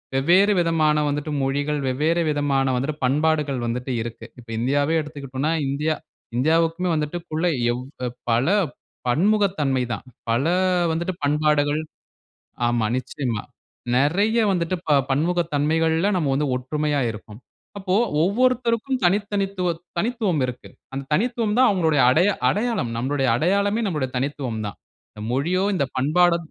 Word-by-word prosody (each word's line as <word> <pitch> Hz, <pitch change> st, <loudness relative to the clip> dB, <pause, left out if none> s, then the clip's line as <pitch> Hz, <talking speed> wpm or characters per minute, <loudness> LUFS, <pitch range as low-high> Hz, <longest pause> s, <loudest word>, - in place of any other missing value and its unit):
வெவ்வேறு 185 Hz, +9 st, +4 dB
விதமான 160 Hz, -3 st, +2 dB
வந்துட்டு 145 Hz, +1 st, -3 dB
மொழிகள், 145 Hz, +2 st, -1 dB
வெவ்வேறு 155 Hz, +6 st, +1 dB
விதமான 140 Hz, -3 st, +1 dB
வந்துட்டு 140 Hz, +4 st, -2 dB
பண்பாடுகள் 145 Hz, -2 st, +1 dB
வந்துட்டு 125 Hz, +3 st, -3 dB
இருக்கு, 115 Hz, 0 st, -7 dB, 0.2 s
இப்போ 115 Hz, -1 st, -12 dB
இந்தியாவே 145 Hz, +6 st, +1 dB
எடுத்துக்கிட்டோம்னா, 145 Hz, 0 st, -3 dB, 0.2 s
இந்தியா 150 Hz, +3 st, 0 dB, 0.4 s
இந்தியாவுக்குமே 165 Hz, +5 st, +2 dB
வந்துட்டுக்குள்ள 160 Hz, +2 st, -2 dB, 0.3 s
எவ் 125 Hz, -, -4 dB, 0.5 s
பல 115 Hz, +2 st, +2 dB, 0.6 s
பன்முகத்தன்மை 160 Hz, -, +2 dB
தான், 105 Hz, -, -7 dB, 0.3 s
பல 120 Hz, +4 st, +1 dB, 0.5 s
வந்துட்டு 170 Hz, +3 st, -2 dB
பண்பாடுகள், 150 Hz, 0 st, +2 dB, 0.9 s
ஆமா 120 Hz, -2 st, +1 dB
நிச்சயமா. 125 Hz, -4 st, -3 dB, 0.5 s
நெறைய 195 Hz, -, +2 dB
வந்துட்டு 180 Hz, -1 st, 0 dB
ப 150 Hz, -, +5 dB
பன்முகத்தன்மைகள்ல 160 Hz, +2 st, +1 dB
நம்ப 160 Hz, -5 st, 0 dB
வந்து 145 Hz, +1 st, 0 dB
ஒற்றுமையா 145 Hz, +3 st, -1 dB
இருக்கோம், 105 Hz, 0 st, -10 dB, 0.4 s
அப்ப 195 Hz, -1 st, -13 dB, 0.4 s
ஒவ்வொருத்தருக்கும் 250 Hz, +4 st, +1 dB
தனி 180 Hz, +3 st, +4 dB, 0.2 s
தனித்துவ 195 Hz, -2 st, -1 dB, 0.3 s
தனித்துவம் 215 Hz, -, 0 dB
இருக்கு, 125 Hz, -1 st, -8 dB, 0.2 s
அந்த 135 Hz, 0 st, -4 dB
தனித்துவம் 230 Hz, +1 st, 0 dB
தான் 260 Hz, -, +6 dB
அவங்களுடைய 160 Hz, -7 st, +2 dB
அடைய 170 Hz, +9 st, +4 dB, 0.2 s
அடையாளம், 210 Hz, -, -1 dB
நம்பளுடைய 135 Hz, +2 st, 0 dB
அடையாளமே 200 Hz, -, +1 dB
நம்பளுடைய 150 Hz, -9 st, -2 dB
தனித்துவம் 130 Hz, -4 st, -3 dB
தான். 100 Hz, -, -7 dB, 0.3 s
இந்த 105 Hz, -, -10 dB
மொழியோ, 170 Hz, +8 st, +1 dB
இந்த 140 Hz, -, +1 dB
பண்பாடோ 170 Hz, +6 st, +3 dB
150 Hz, 120 wpm, -23 LUFS, 135-180 Hz, 0.9 s, தான்